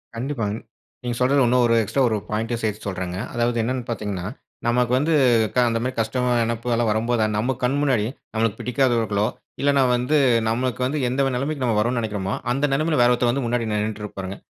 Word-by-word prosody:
கண்டிப்பாங்க. 115 Hz, -4 st, -2 dB, 0.5 s
நீங்க 120 Hz, -1 st, -2 dB
சொல்றது 135 Hz, +2 st, +3 dB
இன்னும் 125 Hz, +1 st, +3 dB
ஒரு 115 Hz, -, +3 dB
எக்ஸ்ட்ரா 135 Hz, +6 st, -1 dB
ஒரு 110 Hz, -, 0 dB
பாயிண்ட் 110 Hz, +2 st, -2 dB
சேர்த்து 105 Hz, -1 st, -3 dB
சொல்றேங்க. 90 Hz, -2 st, -4 dB, 0.2 s
அதாவது 120 Hz, 0 st, 0 dB
என்னென்னு 125 Hz, +2 st, -2 dB
பார்த்தீங்கன்னா, 105 Hz, -5 st, -3 dB, 0.4 s
நமக்கு 120 Hz, 0 st, +2 dB
வந்து 155 Hz, +5 st, +1 dB, 0.4 s
க -, -, -2 dB
அந்த 115 Hz, 0 st, 0 dB
மாதிரி 130 Hz, +1 st, -2 dB
கஷ்டம் 125 Hz, +3 st, 0 dB
மான 120 Hz, -1 st, +2 dB
நினைப்பு 115 Hz, +1 st, -2 dB
எல்லாம் 115 Hz, -1 st, +1 dB
வரும்போது 110 Hz, +1 st, +1 dB
நம்ம 125 Hz, +5 st, 0 dB
கண் 130 Hz, +3 st, +2 dB
முன்னாடி, 130 Hz, -7 st, +2 dB, 0.3 s
நம்மளுக்கு 110 Hz, -2 st, 0 dB
பிடிக்காதவர்களோ, 115 Hz, -5 st, +1 dB, 0.3 s
இல்லன்னா 140 Hz, -1 st, +3 dB
வந்து 125 Hz, +5 st, +1 dB, 0.3 s
நம்மளுக்கு 125 Hz, +2 st, -1 dB
வந்து 145 Hz, +3 st, -1 dB
எந்த 135 Hz, +1 st, +1 dB
நெலமைக்கு 140 Hz, +2 st, -2 dB
நம்ம 115 Hz, -3 st, +1 dB
வரோன்னு 120 Hz, +3 st, +1 dB
நெனைக்கறமோ, 105 Hz, -3 st, -2 dB, 0.2 s
அந்த 140 Hz, +3 st, +1 dB
நெலைமையில 155 Hz, -1 st, +1 dB
வேற 120 Hz, -, +5 dB
ஒருத்தர் 120 Hz, 0 st, +2 dB
வந்து 135 Hz, 0 st, -2 dB
முன்னாடி 115 Hz, -1 st, -1 dB
நின்னுட்டு 105 Hz, 0 st, -2 dB
இருப்பாருங்க. 95 Hz, -1 st, -6 dB
120 Hz, 185 wpm, -23 LUFS, 110-130 Hz, 0.5 s, வேற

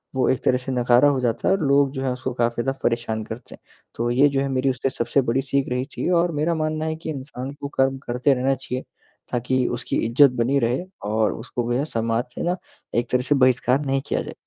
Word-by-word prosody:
वो 130 Hz, -, +2 dB
एक 130 Hz, -, 0 dB
तरह 125 Hz, -, +3 dB
से 130 Hz, +1 st, -5 dB
नकारा 125 Hz, +2 st, +4 dB
हो 135 Hz, -2 st, +1 dB
जाता 120 Hz, -3 st, -1 dB
है -, -, +5 dB
और 195 Hz, -, -4 dB
लोग 140 Hz, -1 st, +4 dB
जो 130 Hz, -, -4 dB
है 130 Hz, -, 0 dB
उसको 130 Hz, 0 st, -4 dB
काफ़ी 120 Hz, 0 st, 0 dB
ज़्यादा 135 Hz, 0 st, -2 dB
परेशान 115 Hz, -2 st, 0 dB
करते 110 Hz, +3 st, -9 dB
हैं। -, -, -29 dB, 0.4 s
तो 120 Hz, +1 st, -1 dB
ये 135 Hz, +4 st, +5 dB
जो 135 Hz, -1 st, 0 dB
है 140 Hz, -, 0 dB
मेरी 130 Hz, 0 st, +1 dB
उससे 130 Hz, +1 st, -1 dB
सबसे 130 Hz, +1 st, +1 dB
बड़ी 125 Hz, +2 st, 0 dB
सीख 140 Hz, 0 st, 0 dB
रही 125 Hz, +1 st, -1 dB
थी -, -, -1 dB
और 175 Hz, -1 st, +3 dB
मेरा 160 Hz, +3 st, +1 dB
मानना 155 Hz, 0 st, -1 dB
है 160 Hz, 0 st, -1 dB
कि 160 Hz, 0 st, -7 dB
इंसान 135 Hz, -2 st, -6 dB
को 140 Hz, -, -3 dB
कर्म 135 Hz, -1 st, +1 dB
करते 125 Hz, +3 st, +2 dB
रहना 135 Hz, +1 st, +1 dB
चाहिए। 130 Hz, 0 st, -5 dB, 0.5 s
ताकि 125 Hz, +1 st, 0 dB
उसकी 120 Hz, -, -3 dB
इज़्ज़त 125 Hz, +4 st, +5 dB
बनी 130 Hz, +4 st, +2 dB
रहे 120 Hz, +7 st, 0 dB, 0.3 s
और 110 Hz, 0 st, +2 dB
उसको 120 Hz, +1 st, -4 dB
वैसा 125 Hz, +4 st, +1 dB, 0.2 s
समाज 115 Hz, +1 st, 0 dB
से -, -, -4 dB
ना 175 Hz, +1 st, +1 dB, 0.4 s
एक 120 Hz, 0 st, 0 dB
तरह 125 Hz, 0 st, +2 dB
से 145 Hz, +3 st, +2 dB
बहिष्कार 130 Hz, 0 st, +3 dB
नहीं 135 Hz, 0 st, 0 dB
किया -, -, 0 dB
जाए। -, -, -7 dB
130 Hz, 240 wpm, -23 LUFS, 120-140 Hz, 0.5 s, है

